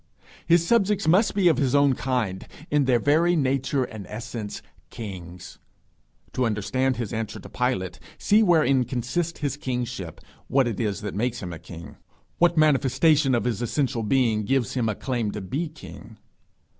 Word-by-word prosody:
His 170 0 +4
subjects 210 -4 +2
must 190 +7 +3
be 195 -3 +3
of 165 - +4
his 135 -1 +1
own 140 -1 +4
kind, 120 -8 -2 0.2
in 145 -2 +3
their 130 -2 +3
very 160 +7 +3
nature 135 -2 0
and 105 -6 -8
essence 110 -1 -6 0.3
kings. 90 -5 -9 0.7
To 130 - 0
understand 125 +4 0
his 120 -3 -4
answer 110 -1 -4
to - - -11
Pilate, 95 -8 -2 0.2
see 210 +1 +3
wherein 155 -9 +4
consists 135 +9 -3
his 140 -2 -2
kingship; 125 -4 -4 0.3
what 135 -1 +2
it 115 -4 -3
is 105 -4 -2
that 105 -1 -5
makes 120 +3 -2
him 90 -1 -5
a 80 - -8
king; 85 +1 -11 0.4
what 170 -1 +3
manifestation 145 -1 +3
of 120 - 0
his 120 -2 -2
essential 125 0 -1
being 110 -2 +1
gives 120 +1 0
him 120 -4 0
a 105 - -2
claim 120 -3 -2
to 105 - -5
be 140 - -3
king. 155 - -12
130 Hz, 170 wpm, -25 LUFS, 110-150 Hz, 0.7 s, His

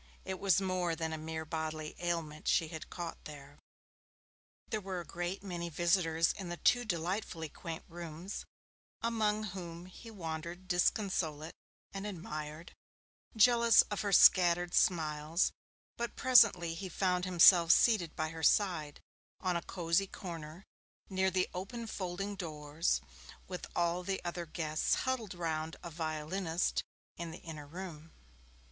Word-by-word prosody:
it 190 -1 -4
was 195 -2 +4
more 185 -3 0
than 160 -1 -3
a - - -1
mere 160 0 -5
bodily 155 -1 -4
ailment 165 -3 -3
she 160 - +3
had 160 -1 -7
caught 170 -2 -6
there. 145 -1 -11 1.1
There 215 - -2
were 190 -2 -4
a 170 - -7
great 175 +3 -4
many 175 -3 -4
visitors 165 0 +2
in 190 -3 -7
the 175 - -4
two 245 +6 +3
delightfully 175 -3 -2
quaint 165 +2 -7
rooms, 170 +2 -7 0.6
among 215 -2 +1
whom 170 -2 -7
he 185 +5 -12
wandered 170 -2 -6
disconsolate 175 -4 0 0.4
and 195 +1 -4
admired, 155 -3 -6 0.6
jealous 235 +1 +6
of 205 - -1
her 205 - -1
scattered 175 -1 +6
smiles, 155 -1 +2 0.5
but 235 0 -3
presently 215 -10 +5
he 185 +3 -5
found 180 0 0
himself 175 -1 +7
seated 185 -8 +4
by 155 0 -1
her 165 0 -7
side 160 -4 +2 0.4
on 185 -2 0
a 170 - 0
'cosy 175 +2 0
corner' 165 -2 -8 0.5
near 190 0 +2
the 185 -1 +1
open 205 +6 -5
folding 195 -1 -4
doors, 155 -3 -1 0.5
with 180 -1 -6
all 175 +1 +1
the 190 +1 -2
other 175 -1 -4
guests 155 -1 0
huddled 235 -8 -2
round 160 -1 -2
a 170 - -6
violinist 160 +2 -1 0.3
in 170 -1 -5
the - - -9
inner 155 -3 -8
room. 165 -1 -8
175 Hz, 140 wpm, -33 LUFS, 160-190 Hz, 1.1 s, himself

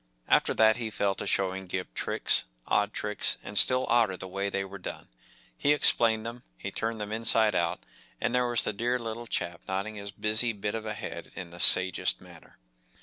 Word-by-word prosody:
After - - +3
that 110 0 +4
he 115 -2 -4
fell 100 -1 0
to - - -6
showing 95 0 -1
Gip 90 -7 -5
tricks, - - 0 0.2
odd - - +1
tricks, - - -2
and 100 - -8
still 130 +5 +3
odder 115 -6 +2
the 95 - -7
way 100 +2 -3
they 100 0 -2
were 100 +1 -10
done. - - -7 0.5
He 145 - +2
explained 115 -6 +5
them, 120 +1 -7 0.2
he - - -6
turned 115 0 -3
them 105 0 -5
inside 110 -1 +3
out, 85 -2 0 0.4
and - - -1
there 125 0 +2
was 120 -1 +3
the 105 - -1
dear 120 +4 -1
little 115 0 -6
chap 85 -4 -3
nodding 95 +3 -3
his 100 -1 -7
busy 110 +4 +1
bit 105 0 -4
of 110 -1 -5
a 105 - -2
head - - -7
in 90 -3 -8
the 85 - -9
sagest 90 0 +5
manner. - - -16
105 Hz, 205 wpm, -28 LUFS, 95-115 Hz, 0.5 s, explained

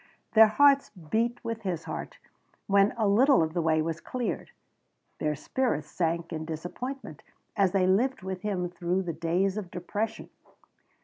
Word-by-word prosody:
Their 220 0 +8
hearts 280 +5 +4
beat 220 +6 -2
with 230 -1 -4
his 180 -5 -3
heart - - -6 0.5
when 200 +1 +4
a 220 -3 +2
little 250 - +5
of 160 0 -3
the 175 - 0
way 160 -1 +2
was 165 +1 -3
cleared; 250 -2 -3 0.7
their 150 0 0
spirits 195 - -2
sank 170 0 -1
in 160 -1 -3
disappointment 175 - -6 0.3
as 195 -4 +3
they 190 -1 +2
lived 210 +5 +2
with 190 -1 -4
him 190 -4 -1
through 180 +1 -1
the 170 -2 -3
days 175 +5 0
of 200 -4 -5
depression. 205 +5 -4
190 Hz, 160 wpm, -28 LUFS, 170-220 Hz, 0.7 s, Their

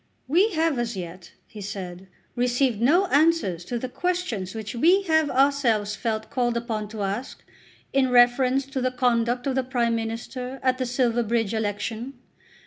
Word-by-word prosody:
"We 370 +9 +3
have 320 -5 +1
as 235 -3 -2
yet," 175 0 -8
he 210 - -11
said, 190 -2 -7 0.3
"received 245 -2 +1
no 335 +11 +4
answers 295 - +2
to 240 - -3
the 255 - -4
questions 250 - -3
which 220 +1 -5
we 345 +11 +4
have 315 -4 +2
felt 255 - -4
ourselves 240 -7 +2 0.3
called 240 -2 0
upon 225 -3 -3
to 210 -1 -5
ask 200 +7 -4 0.5
in 270 -1 +3
reference 250 +2 +4
to 270 -1 -4
the 255 - +1
conduct 245 -1 0
of 275 - 0
the 265 0 0
Prime 245 -2 0
Minister 240 +3 -4
at 255 0 +1
the 255 - -1
Silverbridge 235 -3 0
election. 220 +4 -3
245 Hz, 160 wpm, -25 LUFS, 220-270 Hz, 0.5 s, no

